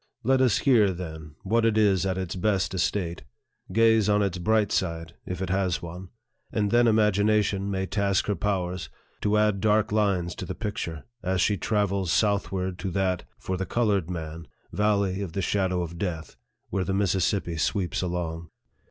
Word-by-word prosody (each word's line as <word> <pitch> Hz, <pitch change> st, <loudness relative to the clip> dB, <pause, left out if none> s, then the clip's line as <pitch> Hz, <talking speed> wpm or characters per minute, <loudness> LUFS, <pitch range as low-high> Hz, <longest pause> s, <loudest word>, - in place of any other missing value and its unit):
Let 130 Hz, +2 st, +3 dB
us 125 Hz, -5 st, +4 dB
hear, 115 Hz, -8 st, +4 dB
then, 80 Hz, -4 st, -7 dB
what 115 Hz, +4 st, +2 dB
it 115 Hz, -1 st, +2 dB
is 95 Hz, -3 st, +3 dB
at 95 Hz, -1 st, -1 dB
its 95 Hz, -1 st, -3 dB
best 95 Hz, -1 st, 0 dB
estate 90 Hz, -2 st, -1 dB, 0.5 s
gaze 110 Hz, 0 st, +4 dB
on 105 Hz, 0 st, +3 dB
its 95 Hz, -2 st, -2 dB
bright 105 Hz, +2 st, +2 dB
side, 85 Hz, -3 st, -2 dB
if 90 Hz, +1 st, -3 dB
it 90 Hz, -, -3 dB
has 95 Hz, -3 st, 0 dB
one; 90 Hz, +2 st, -8 dB, 0.4 s
and 105 Hz, -2 st, 0 dB
then 120 Hz, 0 st, +5 dB
imagination 105 Hz, -2 st, +2 dB
may 95 Hz, -1 st, -1 dB
task 100 Hz, -1 st, +1 dB
her 105 Hz, -, 0 dB
powers 95 Hz, -3 st, -2 dB, 0.3 s
to 105 Hz, 0 st, +2 dB
add 105 Hz, -2 st, +2 dB
dark 110 Hz, +1 st, +2 dB
lines 100 Hz, -5 st, +1 dB
to -, -, -5 dB
the -, -, -4 dB
picture, 85 Hz, -8 st, -4 dB, 0.2 s
as 95 Hz, 0 st, -1 dB
she 105 Hz, +2 st, +3 dB
travels 100 Hz, -2 st, 0 dB
southward 95 Hz, -3 st, 0 dB
to 95 Hz, -, -3 dB
that 95 Hz, 0 st, -1 dB
(for 95 Hz, -, -3 dB
the 95 Hz, -, -2 dB
colored 100 Hz, -7 st, +1 dB
man) 80 Hz, -1 st, -6 dB, 0.3 s
Valley 100 Hz, -2 st, +1 dB
of 90 Hz, -5 st, -5 dB
the 95 Hz, -, -1 dB
Shadow 95 Hz, -3 st, 0 dB
of 85 Hz, 0 st, -7 dB
Death, 85 Hz, -5 st, -4 dB, 0.4 s
where 95 Hz, 0 st, 0 dB
the 95 Hz, +1 st, -1 dB
Mississippi 95 Hz, -2 st, +1 dB
sweeps 90 Hz, +2 st, 0 dB
along. 85 Hz, -2 st, -3 dB
95 Hz, 175 wpm, -26 LUFS, 90-105 Hz, 0.5 s, then